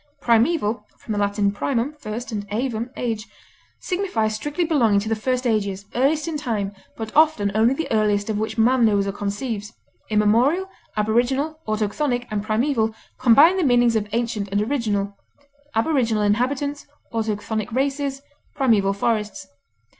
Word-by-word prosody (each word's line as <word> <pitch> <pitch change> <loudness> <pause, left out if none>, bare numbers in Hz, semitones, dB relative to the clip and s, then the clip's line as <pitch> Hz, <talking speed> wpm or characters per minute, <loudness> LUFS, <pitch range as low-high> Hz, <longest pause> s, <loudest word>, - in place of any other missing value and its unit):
Primeval 235 -2 +2 0.2
(L. 205 -1 +1
primum, 245 +6 -1
first, 235 +1 -5
and 205 -2 -4
ævum, 235 +1 -2
age), 225 -3 -3 0.5
signifies 355 - -1
strictly 295 +10 -2
belonging 235 -11 +3
to 205 - -4
the 225 - +1
first 255 +3 -1
ages, 200 -4 0
earliest 290 +5 +1
in 320 -2 -2
time, 215 -8 -2 0.2
but 220 -1 -6
often 300 -10 +4
only 225 +5 +3
the 325 - -3
earliest 210 -2 +2
of 215 -2 -1
which 220 +1 -3
man 245 +2 +4
knows 205 -3 +3
or 200 - -1
conceives, 205 +1 -4 0.4
immemorial. 230 - +3 0.3
Aboriginal, 250 +8 +1
autochthonic, 245 +4 -1
and 210 -1 -1
primeval 220 +1 0 0.2
combine 280 +9 +6
the 370 - +1
meanings 245 -4 +4
of 210 -1 -1
ancient 225 -3 -1
and 200 - +1
original; 210 -6 -1 0.6
aboriginal 230 -4 +1
inhabitants, 260 +7 0 0.3
autochthonic 220 0 -2
races, 275 +2 -1 0.3
primeval 215 -8 +3
forests. 210 0 -1
225 Hz, 140 wpm, -22 LUFS, 210-270 Hz, 0.6 s, combine